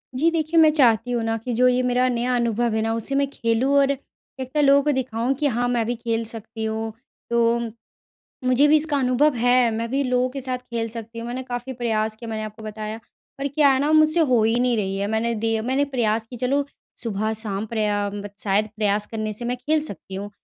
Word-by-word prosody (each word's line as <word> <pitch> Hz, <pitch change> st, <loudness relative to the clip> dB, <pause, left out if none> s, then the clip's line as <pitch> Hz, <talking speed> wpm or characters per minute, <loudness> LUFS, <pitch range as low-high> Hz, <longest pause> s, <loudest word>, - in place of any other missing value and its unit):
जी 310 Hz, +6 st, +3 dB
देखिए, 325 Hz, 0 st, +1 dB
मैं 315 Hz, -1 st, +7 dB
चाहती 245 Hz, -5 st, +3 dB
हूँ 240 Hz, -2 st, 0 dB
न 225 Hz, 0 st, 0 dB
कि 250 Hz, -, -2 dB
जो 250 Hz, +2 st, +4 dB
ये 250 Hz, 0 st, +3 dB
मेरा 250 Hz, 0 st, +2 dB
नया 245 Hz, +1 st, 0 dB
अनुभव 235 Hz, -1 st, 0 dB
है 220 Hz, -, +1 dB
न 225 Hz, -, -1 dB
उसे 230 Hz, +5 st, -3 dB
मैं 280 Hz, 0 st, +2 dB
खेलूँ 235 Hz, +1 st, 0 dB
और 280 Hz, 0 st, +4 dB, 0.5 s
एक 260 Hz, -1 st, -5 dB
न -, -, +4 dB
लोगों 280 Hz, 0 st, +6 dB
को 300 Hz, -, +2 dB
दिखाऊँ 255 Hz, -2 st, -1 dB
कि 290 Hz, +2 st, 0 dB
हाँ, 245 Hz, -2 st, 0 dB
मैं 240 Hz, -2 st, 0 dB
भी 240 Hz, +2 st, -1 dB
खेल 230 Hz, -1 st, -2 dB
सकती 225 Hz, 0 st, -6 dB
हूँ। 220 Hz, 0 st, -3 dB, 0.4 s
तो 235 Hz, 0 st, +2 dB, 0.9 s
मुझे 255 Hz, +3 st, +4 dB
भी 305 Hz, -, +6 dB
इसका 300 Hz, -1 st, 0 dB
अनुभव 260 Hz, +3 st, +3 dB
है 245 Hz, 0 st, +4 dB
मैं 225 Hz, +1 st, -3 dB
भी 275 Hz, +2 st, +1 dB
लोगों 250 Hz, 0 st, +1 dB
के 275 Hz, +1 st, -6 dB
साथ 255 Hz, -1 st, -3 dB
खेल 235 Hz, -2 st, -4 dB
सकती 230 Hz, 0 st, -8 dB
हूँ 230 Hz, -, -5 dB
मैंने 245 Hz, +2 st, -4 dB
काफ़ी 245 Hz, 0 st, -5 dB
प्रयास 220 Hz, -3 st, -1 dB
किया 230 Hz, +1 st, -9 dB
मैंने 220 Hz, -1 st, -3 dB
आपको 215 Hz, +1 st, -9 dB
बताया। 215 Hz, 0 st, -5 dB, 0.4 s
पर 280 Hz, +1 st, -1 dB
क्या 285 Hz, +1 st, +3 dB
है 265 Hz, -, +2 dB
न 295 Hz, -, +1 dB
मुझसे 310 Hz, +2 st, +4 dB
हो 255 Hz, -8 st, +3 dB
ही 225 Hz, +2 st, +2 dB
नहीं 250 Hz, -1 st, +2 dB
रही 195 Hz, -2 st, -1 dB
है 200 Hz, +1 st, -1 dB
मैंने 230 Hz, +1 st, 0 dB
दिए 225 Hz, 0 st, 0 dB
मैंने 260 Hz, +4 st, +1 dB
प्रयास 225 Hz, -5 st, -1 dB
की, 250 Hz, -, -7 dB
चलो 265 Hz, +4 st, 0 dB, 0.3 s
सुबह-शाम 215 Hz, -2 st, -2 dB
प्रया 210 Hz, -2 st, -1 dB, 0.3 s
शायद 205 Hz, +1 st, +2 dB
प्रयास 210 Hz, -1 st, +1 dB
करने 215 Hz, -1 st, -4 dB
से 215 Hz, +3 st, -3 dB
मैं 245 Hz, +1 st, -1 dB
खेल 305 Hz, +5 st, 0 dB
सकती 195 Hz, -, -7 dB
हूँ 200 Hz, +2 st, -5 dB
235 Hz, 225 wpm, -23 LUFS, 220-260 Hz, 0.9 s, मैं